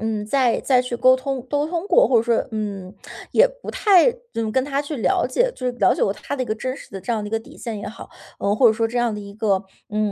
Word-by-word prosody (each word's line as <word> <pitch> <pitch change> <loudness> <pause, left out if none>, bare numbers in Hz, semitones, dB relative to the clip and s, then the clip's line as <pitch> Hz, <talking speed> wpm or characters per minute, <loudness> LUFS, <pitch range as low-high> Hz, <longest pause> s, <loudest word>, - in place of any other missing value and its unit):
嗯， 215 -1 -2
再 255 0 +2
再 255 -2 +3
去 250 -1 -4
沟 255 +2 +5
通 260 +1 -3
沟通 315 +6 -1
过， 390 - +4
或 255 - +4
者 225 - +4
说， 235 -1 +1
嗯， 200 -4 -5 0.4
也 - - +6
不 - - -9
太 405 +2 +5 0.2
就 225 -1 -2
跟 260 +4 +1
他 280 0 -1
去 295 +1 -5
了 210 -7 +1
解 485 - +1
就 255 - -8
是 - - -2
了 190 - +4
解 - - -2
过 195 - +2
他 210 - -6
的 265 - -2
一 - - -4
个 215 - -1
真 255 +4 -4
实 - - -13
的 195 - -7
这 195 +6 -3
样 220 - -1
的 210 - -5
一 - - -11
个 225 - 0
底 225 - -15
线 225 -3 -5
也 205 - -7
好， 210 - -9 0.3
嗯， 200 +1 +1
或 250 - +5
者 220 - +6
说 225 +1 0
这 240 +2 -2
样 240 -2 +1
的 210 - -6
一 200 0 -10
个 205 -2 +1 0.3
嗯， 210 0 0
235 Hz, 315 characters per minute, -22 LUFS, 215-270 Hz, 0.4 s, 也